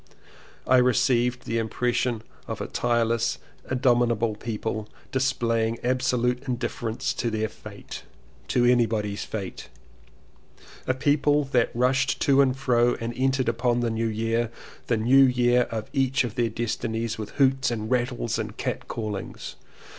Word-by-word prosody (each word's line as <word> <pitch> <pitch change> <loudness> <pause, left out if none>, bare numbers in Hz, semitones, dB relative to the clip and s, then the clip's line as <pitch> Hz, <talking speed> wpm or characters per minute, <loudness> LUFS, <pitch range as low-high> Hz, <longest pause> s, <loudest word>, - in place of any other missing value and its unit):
I 130 - +5
received 125 0 +2
the 115 - -1
impression 120 0 -1 0.2
of - - -4
a - - -3
tireless, 115 -1 0 0.3
in 130 - 0
dominable 120 -3 +2
people 110 -1 -4 0.2
displaying 115 -4 0
absolute 125 0 0
in 125 - 0
difference 120 -1 -3
to 120 - -2
their 110 0 -1
fate 105 -1 -10 0.2
— - - -29
to 120 - +2
anybody's 110 -4 +1
fate; 100 -4 -6 1.2
a 130 - +1
people 145 +2 +2
that 130 -4 +1
rushed 130 +2 +2
to 140 0 +5
and 130 -1 +2
fro 120 -2 +2
and 115 +1 -4
entered 130 0 +1
upon 120 +1 +1
the 120 -1 0
New 115 +1 -1
Year, 115 +1 0 0.4
the 115 - +2
New 130 +5 +6
Year 125 -1 +3
of 110 -1 -4
each 135 -2 +2
of 120 -4 -4
their 120 -2 0
destinies, 115 0 -3
with 105 -1 -6
hoots 135 -1 +3
and 110 -1 -4
rattles 120 -2 0
and 105 -1 -5
catcallings. 105 -3 -4
120 Hz, 145 wpm, -25 LUFS, 115-125 Hz, 1.2 s, New